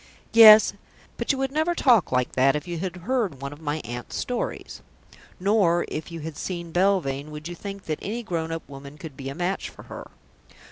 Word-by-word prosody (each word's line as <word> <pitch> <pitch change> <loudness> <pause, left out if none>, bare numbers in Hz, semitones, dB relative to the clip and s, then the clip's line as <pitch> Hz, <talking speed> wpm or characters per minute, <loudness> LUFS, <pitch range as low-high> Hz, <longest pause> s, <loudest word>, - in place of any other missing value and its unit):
Yes, 220 -1 +9 0.4
but - - 0
you 275 - -2
would 270 0 -1
never 315 +4 0
talk 240 - +4
like 125 -1 +1
that 135 +2 +3
if 150 +2 -4
you 170 -1 -4
had 185 0 -4
heard 225 - -1
one 140 +1 -6
of 145 - -14
my 150 0 -2
aunt's 120 +1 -6
stories. 245 -1 -4 0.6
Nor 185 -3 +2
if 155 +2 -5
you 165 -1 -6
had 155 -1 -7
seen 170 -2 -5
Belvane 175 -7 +1
would 150 +1 -7
you 175 - -6
think 195 +2 -8
that 155 -1 -3
any 230 +4 -4
grown 165 -6 -3
up 165 0 -5
woman 140 +1 -11
could 155 -2 -9
be 135 0 -6
a 135 - -7
match 180 +3 -2
for - - -14
her. - - -10
170 Hz, 205 wpm, -25 LUFS, 145-200 Hz, 0.6 s, Yes